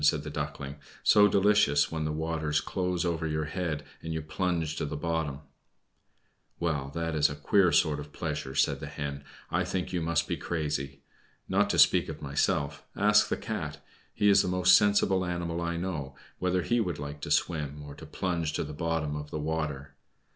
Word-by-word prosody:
said 75 0 +3
the 75 - -6
Duckling. 75 -1 -5 0.3
"So 105 -1 +7
delicious 100 -8 +3
when 80 -1 -2
the 75 - -1
waters 80 -1 -1
close 90 0 -1
over 80 -2 -1
your 75 0 -1
head, 80 -2 -3 0.2
and 80 - -5
you 80 -1 -3
plunge 80 0 -1
to - - -1
the 75 - -4
bottom!" 80 -3 -2 1.2
"Well, 75 -5 -1
that 80 -1 -2
is 75 -1 +3
a 75 - -5
queer 90 +5 +3
sort 75 0 +3
of 75 0 -8
pleasure," 75 -4 -4
said - - +2
the - - -6
Hen. 70 -1 -5 0.3
"I - - +2
think 95 -1 -3
you 90 - 0
must 80 -1 0
be - - -2
crazy. 75 -4 -3 0.5
Not - - +2
to - - +1
speak - - +5
of - - -6
myself, 70 0 -1
ask 105 +1 +4
the - - -1
Cat - - -4 0.3
he 105 - +1
is 100 -1 +7
the - - -2
most 90 0 +5
sensible 100 -2 +3
animal 85 -1 -2
I 85 0 -2
know 80 -7 -4 0.2
whether 90 -1 +1
he 120 +5 +1
would 90 -8 -1
like 75 0 -7
to - - -5
swim, 75 -3 0
or 75 -1 -9
to 80 +2 -11
plunge 85 -2 -2
to - - -1
the 75 0 -7
bottom 80 -1 -1
of 75 0 -6
the - - -4
water. 75 -3 -3
80 Hz, 195 wpm, -29 LUFS, 75-90 Hz, 1.2 s, So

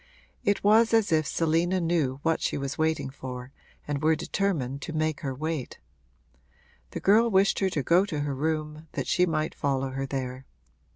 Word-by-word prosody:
It 205 0 +1
was 220 +2 +5
as 220 -5 +2
if 155 -2 +2
Selina 170 +3 +1
knew 160 -6 0
what 165 0 +1
she - - -1
was 140 0 -3
waiting 160 -4 0
for 130 -1 -7 0.4
and 145 -1 -2
were 160 +1 +4
determined 155 -6 -2
to 160 - -6
make 155 -1 0
her 135 -3 -3
wait. 155 -1 -4 1.1
The - - -5
girl 225 +4 +4
wished 195 -1 +3
her 195 - +2
to 150 -6 -2
go 175 +6 +4
to 150 -6 -3
her 145 -1 -2
room, 155 +2 -3
that - - -2
she 180 0 +2
might 155 -1 -1
follow 135 -1 -1
her 135 +1 -3
there. 130 -1 -5
155 Hz, 180 wpm, -27 LUFS, 135-175 Hz, 1.1 s, was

